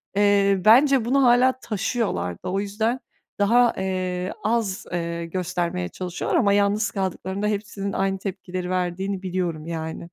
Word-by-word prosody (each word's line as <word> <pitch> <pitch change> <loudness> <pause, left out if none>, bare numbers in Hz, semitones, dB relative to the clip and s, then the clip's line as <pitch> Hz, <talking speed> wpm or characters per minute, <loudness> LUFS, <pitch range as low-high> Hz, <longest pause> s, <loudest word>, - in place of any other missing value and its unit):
Eee, 200 -2 +3
bence 260 +2 +6
bunu 270 +2 +3
hâlâ 255 +1 +4
taşıyorlardı. 210 - -2
O 195 +1 0
yüzden 220 +5 -1 0.4
daha, 235 +3 +4
eee, 185 -1 -2
az, 215 -4 0
eee, 170 -1 -2
göstermeye 180 0 -2
çalışıyorlar 180 -1 -2
ama 200 -4 +3
yalnız 205 +1 +2
kaldıklarında 190 +1 -2
hepsinin 200 -1 -3
aynı 195 0 0
tepkileri 185 -2 -5
verdiğini 185 +2 -2
biliyorum 175 -4 -2
yani. 160 0 -4
195 Hz, 130 wpm, -24 LUFS, 180-215 Hz, 0.4 s, bence